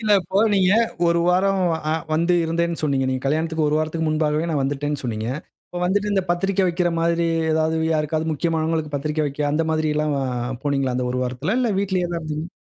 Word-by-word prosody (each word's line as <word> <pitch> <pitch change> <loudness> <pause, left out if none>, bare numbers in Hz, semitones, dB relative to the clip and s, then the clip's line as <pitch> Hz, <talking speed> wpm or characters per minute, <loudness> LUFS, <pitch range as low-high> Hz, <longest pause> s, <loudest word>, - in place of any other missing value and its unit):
இல்ல. 215 -2 +2
இப்போ 190 +2 -2 0.2
நீங்க 190 -1 +4 0.3
1 170 0 +3
வாரம் 190 +2 +2 0.3
அ - - +2 0.2
வந்து 170 +3 +2
இருந்தேன்னு 170 +1 -1
சொன்னீங்க. 140 -3 +1
நீங்க 130 0 -2
கல்யாணத்திற்கு 160 +2 0
1 150 - +1
வாரத்துக்கு 160 +1 -1
முன்பாகவே 155 +1 0
நான் 145 -4 0
வந்துட்டேன்னு 145 +1 -2
சொன்னீங்க. 110 -2 -3 0.4
இப்போ 175 - -6
வந்துட்டு 205 +3 +1
இந்த 195 - +2
பத்திரிக்கை 195 +2 +1
வைக்கிற 175 0 +1
மாதிரி, 170 0 +1 0.3
ஏதாவது 160 0 +1 0.2
யாருக்காவது 155 +1 -1
முக்கியமானவங்களுக்கு 160 -1 -1
பத்திரிக்கை 150 +2 -1
வைக்க 145 +1 -2
அந்த 160 +2 +2
மாதிரில்லாம் 155 -1 0
அ - - -1 0.4
போனீங்களா? 135 -3 0
அந்த 125 -1 -1
1 125 - -1
வாரத்தில. 135 - -2
இல்ல 240 -3 +1
வீட்லேயே 185 -3 0
தான் 170 -1 -2
இருந்தீங்களா? 155 +1 -4
160 Hz, 185 wpm, -22 LUFS, 150-175 Hz, 0.4 s, நீங்க